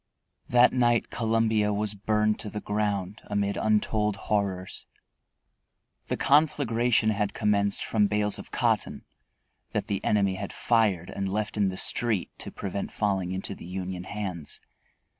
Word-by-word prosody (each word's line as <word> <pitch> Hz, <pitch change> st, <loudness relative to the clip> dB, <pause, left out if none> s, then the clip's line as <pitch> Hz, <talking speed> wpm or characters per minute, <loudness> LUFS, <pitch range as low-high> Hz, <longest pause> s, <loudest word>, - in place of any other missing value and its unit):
That 125 Hz, +1 st, +6 dB
night 120 Hz, -2 st, +2 dB
Columbia 110 Hz, -2 st, +1 dB
was 105 Hz, 0 st, -1 dB
burned 105 Hz, +1 st, +1 dB
to 105 Hz, -, -5 dB
the 105 Hz, -, -5 dB
ground 105 Hz, -1 st, -2 dB
amid 100 Hz, -1 st, -1 dB
untold 105 Hz, -1 st, +1 dB
horrors. 95 Hz, -2 st, -2 dB, 1.2 s
The -, -, -1 dB
conflagration 125 Hz, -6 st, +3 dB
had 105 Hz, -1 st, -1 dB
commenced 100 Hz, -2 st, +1 dB
from 105 Hz, -2 st, +2 dB
bales 105 Hz, 0 st, 0 dB
of -, -, -10 dB
cotton -, -, 0 dB, 0.7 s
that -, -, -1 dB
the 100 Hz, -3 st, -3 dB
enemy 100 Hz, -2 st, +2 dB
had 95 Hz, -, -5 dB
fired 105 Hz, -7 st, +1 dB
and 100 Hz, -1 st, -3 dB
left 105 Hz, +1 st, -2 dB
in 100 Hz, -2 st, +2 dB
the 95 Hz, -, -5 dB
street 110 Hz, -4 st, +1 dB
to -, -, -4 dB
prevent 100 Hz, 0 st, -4 dB
falling 95 Hz, -4 st, 0 dB
into 95 Hz, +1 st, -3 dB
the -, -, -11 dB
Union 90 Hz, 0 st, -5 dB
hands. 95 Hz, -8 st, -5 dB
105 Hz, 140 wpm, -27 LUFS, 100-110 Hz, 1.2 s, That